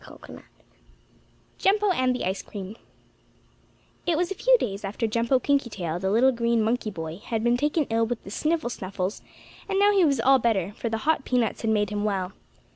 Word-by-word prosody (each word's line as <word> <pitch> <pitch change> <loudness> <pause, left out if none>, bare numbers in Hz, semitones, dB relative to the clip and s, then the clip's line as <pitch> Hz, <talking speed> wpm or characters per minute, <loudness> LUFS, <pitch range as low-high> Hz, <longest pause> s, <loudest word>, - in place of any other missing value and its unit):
STORY - - -13 0.2
V - - -14 1.2
JUMPO 410 +1 +3
AND 255 -6 +1
THE - - -3
ICE 190 +2 -2
CREAM 200 0 -8 1.3
It 335 -3 +2
was 350 +2 0
a - - +1
few - - +4
days 200 - -4
after 205 +4 -2
Jumpo 230 +4 +2
Kinkytail, 225 - -1
the 190 - 0
little 240 +6 +4
green 235 -2 +1
monkey 225 0 0
boy, 165 -4 -6
had 225 +1 -3
been 240 0 +3
taken 295 +4 +1
ill 225 0 +2
with 240 0 -4
the 195 - -10
sniffle 310 0 -1
snuffles, 190 -1 -4 0.5
and 390 - 0
now 405 +1 +5
he 395 -3 +4
was 280 -6 +2
all 265 +3 +5
better, 205 -6 0
for 230 - -4
the 225 +3 -4
hot 315 -3 +2
peanuts 245 -4 0
had 225 - -1
made 210 -2 +1
him 205 0 -2
well. 195 -3 -1
230 Hz, 200 wpm, -25 LUFS, 205-275 Hz, 1.3 s, now